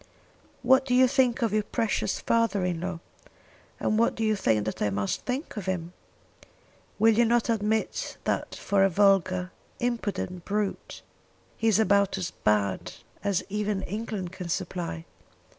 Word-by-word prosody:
"What 265 +1 +5
do 250 -2 0
you 255 0 +6
think 255 -2 +2
of 220 -3 +1
your 215 - +3
precious 215 -2 -1
father 225 -5 +1
in 175 -2 -2
law; 180 -2 -4 0.8
and 215 - +1
what 230 - +2
do 225 - -2
you 215 -1 +2
think 110 - +1
that 110 - -4
I 105 - +2
must 100 0 -2
think 260 +4 -3
of 195 -2 -5
him? 175 -2 -3 1.0
Will 225 +1 +5
you 235 - +5
not 235 +1 +2
admit 220 -1 -1
that - - -2
for 200 -1 +1
a 195 - +5
vulgar, 185 -1 +2 0.3
impudent 205 -7 -2
brute, 205 0 -3 0.5
he 225 - -1
is 215 -3 +4
about 200 -2 +3
as 180 -2 -3
bad 100 - 0 0.3
as 200 -3 0
even 210 -1 -2
England 205 -3 -4
can 185 -2 -7
supply?" 170 - -3
200 Hz, 160 wpm, -27 LUFS, 180-225 Hz, 1.0 s, you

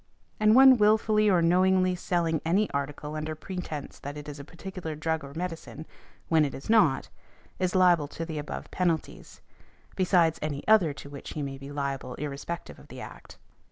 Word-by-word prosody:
And 215 +1 +5
one 265 0 +8
wilfully 215 0 +4
or 180 -3 +3
knowingly 185 +2 +3
selling 170 -3 -1
any 190 +6 +2
article 145 +2 -4
under 155 0 -4
pretence 160 -3 -6
that 145 +1 -7
it 150 0 -8
is 145 -1 -7
a - - -7
particular 170 0 -7
drug 160 +1 -2
or 140 +1 -10
medicine, 165 -3 -6 0.4
when 160 -2 +4
it 140 - -2
is 135 - -4
not, 165 -12 +3 0.5
is 185 -1 0
liable 175 -5 +4
to 165 +3 -6
the 160 -2 -5
above 145 - -7
penalties, 170 -4 -2 0.5
besides 175 -3 +3
any 145 -2 -4
other 210 -8 +5
to 140 - -11
which 140 - -8
he 150 - -3
may 135 -1 -5
be 140 +1 -9
liable 140 -3 -4
irrespective 150 +4 -6
of - - -16
the - - -10
Act. - - -11
160 Hz, 180 wpm, -27 LUFS, 145-185 Hz, 0.5 s, one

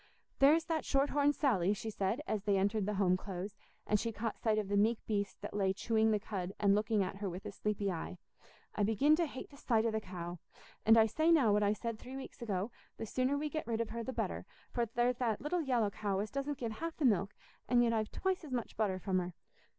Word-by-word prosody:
"There's 310 +4 +6
that 320 -1 -1
shorthorned 285 +1 +2
Sally," 205 - +2
she 220 +2 -5
said, 205 +6 -1
as 215 - -1
they 200 -1 +2
entered 200 +1 +1
the 210 - -1
Home 190 -2 +3
Close, 190 +1 -5 0.3
and 210 - +2
she 230 - -1
caught 225 0 -4
sight 220 -2 +1
of 210 -2 0
the 205 - 0
meek 215 +3 +3
beast 205 -2 -2
that - - -6
lay 195 -2 +1
chewing 220 +2 +2
the 215 -1 +2
cud 195 -2 -4
and 200 -1 +4
looking 210 0 +2
at 190 +1 -4
her 200 -1 -3
with 180 +2 -7
a - - -4
sleepy 200 -1 -1
eye. 175 +1 -5 0.6
"I - - -2
begin 225 +9 +4
to 340 -1 +1
hate 265 - -8
the 280 - -14
sight 225 -4 +1
o' 230 - +2
the 220 0 -1
cow; 175 -2 -6 0.5
and 225 +1 +8
I 220 - +7
say 315 +9 +2
now 265 -11 +5
what 210 - +3
I 205 0 +3
said 230 0 -4
three 255 +1 -9
weeks 270 - -9
ago, 205 -1 -2 0.3
the - - -4
sooner 255 +5 0
we 300 +1 -1
get 310 -1 -4
rid 230 -1 -1
of 230 - -1
her 235 +1 -3
the 260 - -3
better, - - -3 0.2
for 235 -1 0
there's 240 +2 +1
that 230 -4 0
little 335 +5 -1
yallow 240 -8 +1
cow 200 -2 -2
as 205 +2 -2
doesn't 275 +1 -2
give 235 -4 -3
half 325 +9 -5
the 305 - 0
milk, 200 -3 +2 0.3
and 240 0 +5
yet 230 -1 +2
I've 215 -1 0
twice 380 -2 -1
as 300 - -9
much 245 -3 -3
butter 205 -4 0
from 185 0 0
her." 180 -1 -5
220 Hz, 250 wpm, -34 LUFS, 200-255 Hz, 0.6 s, and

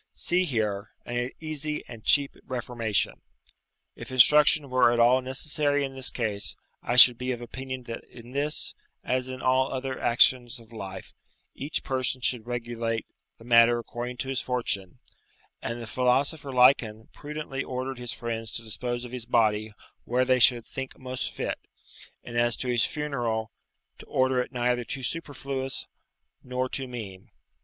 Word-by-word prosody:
See, 180 +1 +1
here, 110 - -2 0.2
an 120 +1 -2
easy 155 -1 -3
and 115 -2 -10
cheap 140 -1 +5
reformation. 120 -4 -1 0.7
If - - -9
instruction 145 +2 +6
were 130 -2 +5
at 120 - 0
all 125 +2 +5
necessary 145 +2 +2
in 135 - -6
this 135 -1 +2
case, 105 -4 -3 0.3
I 120 - -2
should 125 -1 +9
be 125 0 -2
of 120 - -3
opinion 130 +1 -6
that 115 -1 -7
in 120 0 -14
this, 145 +3 -2 0.3
as 130 0 -1
in 130 0 -7
all 130 +1 +2
other 130 0 -4
actions 120 +1 +3
of 115 0 -18
life, 95 -3 -8 0.4
each 145 +4 -4
person 130 -1 0
should 120 -2 0
regulate 115 -2 -3 0.3
the - - -16
matter 120 0 +6
according 120 +1 -6
to - - -6
his 135 -1 -1
fortune; 105 -7 0 0.6
and 115 +1 -4
the 115 - -6
philosopher 135 +5 0
Lycon 125 -4 +3
prudently 150 -2 -5
ordered 130 0 -4
his 120 -1 -3
friends 115 -1 -5
to 115 - -4
dispose 120 +2 -4
of 120 - -9
his 125 -2 -5
body 110 -2 +2 0.3
where 125 +2 +1
they 130 0 +3
should 120 -1 +4
think 135 -1 -7
most 130 0 -4
fit, - - -3 0.6
and 120 - -9
as 120 0 +2
to 130 - -4
his 120 -2 +2
funeral, 120 -7 -2 0.5
to - - -12
order 130 -1 +2
it - - -6
neither 125 -1 0
too 130 +3 -6
superfluous 135 -3 -3 0.6
nor 125 0 -2
too 130 0 -4
mean. 105 -7 -8
125 Hz, 160 wpm, -27 LUFS, 115-130 Hz, 0.7 s, should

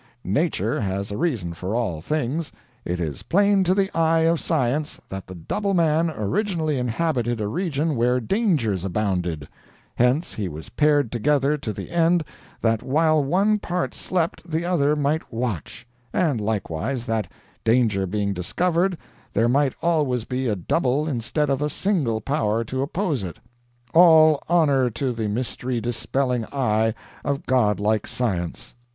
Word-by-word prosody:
Nature 130 - 0
has 100 0 -2
a - - -3
reason 115 - -1
for 95 +6 -4
all 95 -10 -1
things. 150 - -2 0.3
It 90 0 -2
is 75 -6 -3
plain 200 +1 +3
to 185 +2 +3
the 195 0 0
eye 165 0 +3
of 165 0 +3
science 150 0 -1
that 95 0 -6
the 95 - -9
Double 195 - -2
Man 165 -1 +3
originally 160 - -1
inhabited 120 -1 -1
a 105 - -1
region 155 - -1
where 125 +1 +2
dangers 125 - 0
abounded; 90 -7 -1 0.5
hence 125 +7 +1
he 100 -4 -3
was 80 0 -8
paired 145 -5 +2
together 140 +4 +2
to 110 - -3
the 100 - -7
end 170 0 +3 0.4
that 115 -1 +2
while 155 +2 +2
one 195 +9 +2
part 180 -2 -2
slept 175 -3 -1
the 165 +1 -1
other 150 -5 +2
might 150 +2 -1
watch; 115 - -4 0.2
and 145 -11 +1
likewise 110 +3 -2
that, 110 -3 -2 0.3
danger 110 -5 +2
being 100 +1 -1
discovered, 175 - 0 0.4
there 115 +3 +3
might 135 +2 +2
always 145 -9 +1
be 130 0 -2
a 105 - +1
double 135 - 0
instead 140 +2 -1
of 135 0 0
a 150 - 0
single 150 - 0
power 115 -6 0
to 130 +4 -3
oppose 155 - -1
it. 90 -3 -6 0.6
All 160 -3 +7
honor 145 -7 +3
to 125 +3 -2
the 110 -2 -2
mystery 125 +2 -2
dispelling 120 +1 -1
eye 110 -4 0 0.3
of 140 -1 -2
godlike 105 -4 +2
Science!" 90 -9 -2
130 Hz, 150 wpm, -23 LUFS, 110-160 Hz, 0.6 s, All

